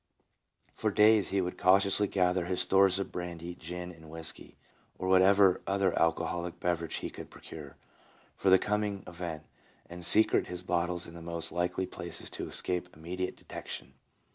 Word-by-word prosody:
For 110 Hz, -, -1 dB
days 105 Hz, 0 st, +5 dB
he 100 Hz, 0 st, +1 dB
would 90 Hz, 0 st, -4 dB
cautiously 100 Hz, +2 st, +4 dB
gather 90 Hz, -2 st, +1 dB
his 90 Hz, 0 st, -1 dB
stores 95 Hz, -1 st, +4 dB
of 100 Hz, -, -3 dB
brandy, 90 Hz, -1 st, -5 dB
gin, 90 Hz, +1 st, -7 dB
and 80 Hz, -2 st, -14 dB
whisky, 80 Hz, 0 st, -5 dB, 0.4 s
or 95 Hz, -, -4 dB
whatever 95 Hz, 0 st, +5 dB
other 100 Hz, -2 st, +1 dB
alcoholic 85 Hz, +1 st, -1 dB
beverage 85 Hz, -2 st, -1 dB
he -, -, -4 dB
could -, -, -9 dB
procure, 75 Hz, -4 st, -11 dB, 0.6 s
for 95 Hz, -, +1 dB
the 95 Hz, -, +8 dB
coming 105 Hz, -1 st, -1 dB
event, 85 Hz, -3 st, -6 dB, 0.4 s
and 90 Hz, 0 st, -9 dB
secrete 105 Hz, +6 st, +5 dB
his 90 Hz, 0 st, -5 dB
bottles 90 Hz, 0 st, -1 dB
in 85 Hz, -, -10 dB
the 85 Hz, -, -10 dB
most 85 Hz, 0 st, -4 dB
likely 90 Hz, +2 st, -1 dB
places 85 Hz, -2 st, -5 dB
to -, -, -5 dB
escape 90 Hz, -1 st, -1 dB
immediate 90 Hz, +4 st, -4 dB
detection. 65 Hz, -, -7 dB
90 Hz, 160 wpm, -30 LUFS, 85-95 Hz, 0.6 s, the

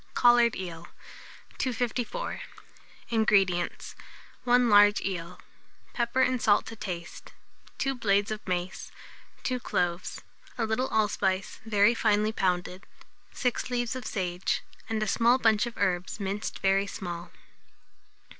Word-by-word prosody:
COLLARED 240 Hz, -1 st, +5 dB
EEL. 175 Hz, -2 st, -7 dB, 0.7 s
254. 250 Hz, -, -2 dB, 0.7 s
INGREDIENTS. 200 Hz, -6 st, +1 dB, 0.5 s
1 245 Hz, 0 st, +4 dB
large 205 Hz, -1 st, +6 dB
eel; 175 Hz, -3 st, -4 dB, 0.5 s
pepper 240 Hz, +2 st, 0 dB
and 255 Hz, -2 st, +1 dB
salt 205 Hz, -1 st, +3 dB
to 225 Hz, -, -8 dB
taste; 175 Hz, -5 st, -7 dB, 0.4 s
2 270 Hz, -, 0 dB
blades 205 Hz, -4 st, +1 dB
of 215 Hz, -, -3 dB
mace, 180 Hz, 0 st, -3 dB, 0.5 s
2 255 Hz, -1 st, -1 dB
cloves, 175 Hz, -5 st, -2 dB, 0.4 s
a 230 Hz, -, 0 dB
little 220 Hz, +4 st, 0 dB
allspice 195 Hz, -3 st, 0 dB
very 210 Hz, +1 st, +4 dB
finely 215 Hz, -2 st, +2 dB
pounded, 180 Hz, -1 st, -2 dB, 0.5 s
6 250 Hz, 0 st, -1 dB
leaves 245 Hz, -1 st, -1 dB
of 255 Hz, -3 st, -5 dB
sage, 180 Hz, -2 st, -2 dB, 0.3 s
and 220 Hz, -1 st, 0 dB
a -, -, -2 dB
small 235 Hz, +4 st, +4 dB
bunch 225 Hz, -2 st, +3 dB
of 235 Hz, -, -8 dB
herbs 185 Hz, 0 st, -1 dB
minced 200 Hz, +1 st, -3 dB
very 195 Hz, +1 st, +2 dB
small. 175 Hz, -3 st, -6 dB
210 Hz, 120 wpm, -28 LUFS, 190-235 Hz, 0.7 s, large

